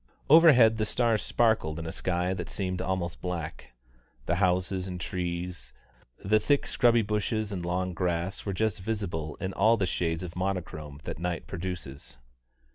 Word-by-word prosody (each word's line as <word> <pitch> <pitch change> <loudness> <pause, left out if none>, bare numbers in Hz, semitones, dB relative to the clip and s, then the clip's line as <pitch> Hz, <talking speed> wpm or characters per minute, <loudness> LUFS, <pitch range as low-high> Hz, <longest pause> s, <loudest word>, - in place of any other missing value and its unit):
Overhead, 135 -9 +8
the 110 - 0
stars 115 -3 +2
sparkled 110 -10 +1
in 80 - -5
a 80 - -4
sky 90 +1 -1
that 90 -3 -5
seemed 90 -2 -3
almost 90 -2 -2
black. 85 -7 -5 0.5
The - - +1
houses 90 0 +1
and 90 -1 -5
trees, 85 -7 -4 0.4
the 110 +2 +2
thick 145 +6 +2
scrubby 120 -1 +3
bushes 105 +1 -1
and 90 -3 -4
long 90 +1 -1
grass, 85 +1 -2
were 100 - -2
just 110 +2 0
visible 90 -8 -3
in 95 0 -3
all 110 +4 +4
the 100 - +1
shades 80 -1 -1
of 90 -1 -7
monochrome 80 -6 -4
that - - -6
night 90 -1 -3
produces. 80 -8 -6
90 Hz, 160 wpm, -28 LUFS, 85-105 Hz, 0.5 s, Overhead